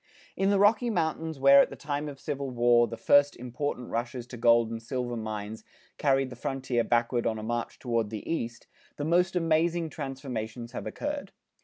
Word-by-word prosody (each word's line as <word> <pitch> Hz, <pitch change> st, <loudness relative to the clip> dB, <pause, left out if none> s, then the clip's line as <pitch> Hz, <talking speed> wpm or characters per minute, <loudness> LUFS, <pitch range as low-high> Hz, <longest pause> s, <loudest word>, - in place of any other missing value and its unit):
In 195 Hz, 0 st, +1 dB
the 200 Hz, -, +3 dB
Rocky 215 Hz, +4 st, +4 dB
Mountains 160 Hz, -5 st, -1 dB
where 140 Hz, +1 st, +8 dB
at -, -, +1 dB
the -, -, -8 dB
time 145 Hz, +1 st, -3 dB
of 140 Hz, -2 st, -10 dB
Civil 140 Hz, 0 st, -4 dB
War, 120 Hz, -1 st, +4 dB
the 115 Hz, +1 st, -7 dB
first 145 Hz, +5 st, +4 dB
important 125 Hz, +1 st, -4 dB
rushes 120 Hz, +1 st, -3 dB
to 125 Hz, -, -10 dB
gold 115 Hz, -1 st, +4 dB
and 115 Hz, 0 st, -5 dB
silver 120 Hz, 0 st, -3 dB
mines 110 Hz, -1 st, -5 dB, 0.4 s
carried 135 Hz, -2 st, +2 dB
the -, -, -7 dB
frontier 130 Hz, -1 st, -1 dB
backward 120 Hz, 0 st, +1 dB
on 110 Hz, -1 st, -1 dB
a 110 Hz, -, -6 dB
march 120 Hz, +1 st, -3 dB
toward 115 Hz, -4 st, -1 dB
the 110 Hz, -1 st, -7 dB
east, 120 Hz, -8 st, -3 dB, 0.3 s
the 145 Hz, -, -3 dB
most 180 Hz, +3 st, +2 dB
amazing 165 Hz, -1 st, +1 dB
transformations 125 Hz, -5 st, -5 dB
have -, -, -6 dB
occurred. 290 Hz, 0 st, -4 dB
130 Hz, 185 wpm, -28 LUFS, 115-150 Hz, 0.4 s, where